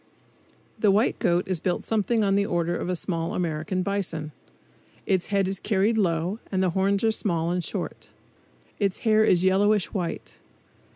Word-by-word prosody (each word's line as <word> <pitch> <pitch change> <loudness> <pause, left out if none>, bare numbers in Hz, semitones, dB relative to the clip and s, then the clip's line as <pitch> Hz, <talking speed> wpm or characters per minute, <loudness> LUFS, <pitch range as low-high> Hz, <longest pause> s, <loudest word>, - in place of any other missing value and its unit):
The 215 - +3
white 205 +5 +2
goat 175 +1 +1
is 185 -3 0
built 180 +2 -1
something 225 +1 +1
on 195 -1 +2
the 200 +1 +3
order 175 -2 -1
of 175 - -3
a 180 - 0
small 165 -1 -2
American 175 +2 -2
bison. 175 -6 -2 0.7
Its 185 -2 0
head 200 -2 +1
is 190 -1 -2
carried 210 +1 +1
low 180 0 0
and 190 -1 +1
the 185 - +1
horns 195 +3 +1
are 225 - +4
small 170 -6 -1
and 180 0 -1
short. - - -5 0.7
Its 200 -3 -1
hair 220 -1 +5
is 180 -4 +3
yellowish 200 +1 +2
white. 180 -4 -4
190 Hz, 170 wpm, -25 LUFS, 175-205 Hz, 0.7 s, hair